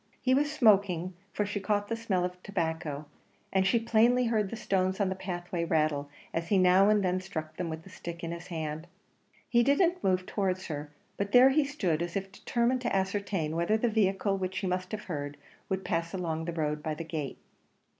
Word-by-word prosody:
He 255 - +2
was 290 +2 +2
smoking, 200 - +3 0.2
for 210 - -1
she 205 0 -3
caught 205 +1 0
the 230 - -1
smell 200 -6 0
of 180 - -2
the 180 - -22
tobacco, 160 -6 -3 0.5
and 190 0 +3
she 235 - +4
plainly 235 +2 +3
heard 215 -4 +1
the - - -5
stones 190 -3 0
on 200 -2 +2
the 190 - -2
pathway 175 -2 -4
rattle 155 -3 +1 0.2
as 165 0 -2
he 200 - +3
now 185 +2 +6
and 210 -1 +3
then 185 0 +1
struck 160 -5 -6
them 175 -2 -2
with 160 0 -5
the 190 - -14
stick 170 -1 -7
in 165 - -3
his 170 +1 -7
hand. 160 -1 -4 0.6
He 240 0 +4
didn't 340 +8 +3
move 185 -1 +2
towards 190 -2 -1
her; 150 -1 -5 0.3
but 200 0 -2
there 250 +2 +9
he 305 +2 +4
stood, 185 - -1
as 170 0 -3
if 195 -1 -3
determined 240 +5 0
to 245 - -1
ascertain 190 -4 -1
whether 170 +6 +2
the 235 +2 +1
vehicle 195 -2 +1
which 190 0 -3
he 195 - -2
must 185 0 -2
have 215 -1 -4
heard, 145 -4 -5 0.3
would 190 0 -2
pass 170 +2 -1
along 165 -3 -2
the 170 - -3
road 150 -2 -1
by 155 0 -2
the 165 - -5
gate. 155 -4 -4
185 Hz, 215 wpm, -30 LUFS, 165-210 Hz, 0.6 s, there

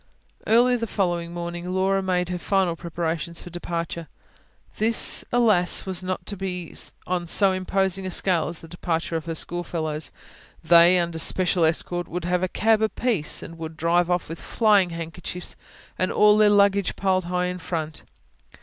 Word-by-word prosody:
Early 245 +2 +4
the 230 -1 -3
following 175 -5 -1
morning 175 0 -5
Laura 190 +1 +1
made 180 -2 -1
her 180 -1 -3
final 185 -2 +1
preparations 170 -1 -4
for 175 - -10
departure. 170 -1 -5 0.7
This, 225 +1 +3
alas! 215 -7 +3
was 190 -1 -1
not 185 0 -4
to 205 - -5
be 180 -3 -5 0.3
on 175 -1 -2
so 195 +3 +4
imposing 190 0 -1
a - - -3
scale 180 -2 +1
as 170 - -5
the 165 - -11
departures 165 0 -2
of 160 - -7
her 165 -1 -4
schoolfellows. 160 -3 -3 0.5
They, 170 +2 +6
under 170 -2 -1
special 180 +1 +2
escort, 175 +2 -1
would 175 0 -5
have 180 0 0
a 185 - +1
cab 220 +3 +2
apiece, 220 -6 0
and 165 0 -10
would 160 -1 -7
drive 170 +2 +2
off 175 0 0
with 165 +1 -8
flying 205 -5 +3
handkerchiefs 165 +1 -7 0.4
and 185 - +1
all 210 0 +5
their 215 0 +5
luggage 200 -1 +3
piled 185 -2 0
high 180 +1 -1
in 180 0 -4
front. 160 -3 -4
180 Hz, 165 wpm, -24 LUFS, 170-190 Hz, 0.7 s, They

